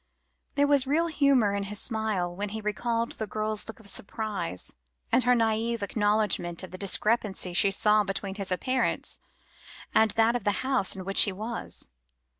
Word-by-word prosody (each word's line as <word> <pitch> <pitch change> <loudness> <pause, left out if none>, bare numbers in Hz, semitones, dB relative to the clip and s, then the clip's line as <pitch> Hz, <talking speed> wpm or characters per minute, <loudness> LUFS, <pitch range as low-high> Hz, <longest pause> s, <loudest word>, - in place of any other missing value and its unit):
There 285 - +4
was 285 -2 +3
real 315 +5 +2
humour 280 -9 +3
in 200 0 -2
his 205 +1 -6
smile 215 -6 -2
when 205 +2 -3
he 220 +2 -5
recalled 230 +2 -1
the 220 - -5
girl's 215 0 -3
look 225 - -8
of 220 - -14
surprise, 200 - -3 0.4
and 250 +2 +4
her 250 0 +5
naïve 225 0 0
acknowledgment 205 -4 0
of 185 - -8
the 185 - -7
discrepancy 200 -2 0
she 195 +3 +4
saw 210 +2 +3
between 195 0 -3
his 195 -1 -5
appearance, 255 +8 -1 0.7
and 220 0 +5
that 225 +2 +2
of 245 - -2
the 205 +2 0
house 260 -9 0
in 190 -1 -7
which 195 0 +5
he 205 - +6
was. 220 +5 -6
215 Hz, 175 wpm, -28 LUFS, 200-235 Hz, 0.7 s, he